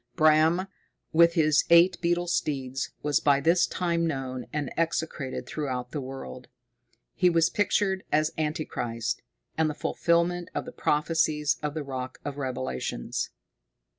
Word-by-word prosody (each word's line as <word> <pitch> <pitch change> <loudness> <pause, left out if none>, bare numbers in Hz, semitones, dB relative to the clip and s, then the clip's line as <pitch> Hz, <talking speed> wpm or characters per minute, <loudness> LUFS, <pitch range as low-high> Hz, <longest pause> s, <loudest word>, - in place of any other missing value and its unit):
Bram, 160 +3 +4 0.5
with 170 +1 +5
his 155 -2 +4
eight 170 +2 +6
beetle 175 0 +1
steeds, 135 -6 -2
was 145 0 +2
by 140 -1 +3
this 170 +5 +3
time 170 -2 0
known 130 -4 -4
and 145 -3 -3
execrated 160 -5 -2
throughout 125 -5 -4
the 145 - -3
world. 130 -1 -8 0.7
He 180 -2 +3
was 165 -1 +3
pictured 195 -2 +1
as 155 0 +2
Anti 155 +1 -1
Christ, 115 -1 -3 0.4
and 160 -1 +3
the 150 - -4
fulfilment 170 +2 0
of - - -2
the - - -7
prophecies 150 -1 +1
of 150 0 -3
the 155 - -2
Rock 130 -2 -5
of 145 -1 -4
Revelations. 130 - -3
155 Hz, 140 wpm, -27 LUFS, 135-170 Hz, 0.7 s, eight